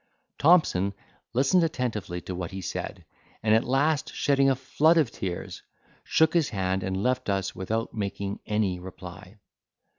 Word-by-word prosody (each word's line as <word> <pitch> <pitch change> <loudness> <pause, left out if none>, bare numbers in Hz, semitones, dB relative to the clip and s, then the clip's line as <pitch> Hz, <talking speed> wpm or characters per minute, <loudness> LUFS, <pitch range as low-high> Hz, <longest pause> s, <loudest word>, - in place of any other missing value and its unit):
Thompson 120 - +4 0.4
listened 140 +8 +3
attentively 110 - -2
to 95 - -6
what 90 -1 -4
he 95 -1 -6
said, - - -5 0.4
and 110 0 +3
at 110 - +4
last, 145 +4 +1
shedding 140 -1 +3
a 135 - +3
flood 150 +5 +3
of 150 -8 +3
tears, 90 -3 -5 0.4
shook 160 0 +3
his 170 -4 +2
hand, 95 -2 -1
and 95 +1 -2
left 125 -3 0
us 95 -1 -1
without 110 +5 -3
making 100 -1 -3
any 105 -4 0
reply. 90 +2 -10
105 Hz, 150 wpm, -27 LUFS, 95-135 Hz, 0.4 s, Thompson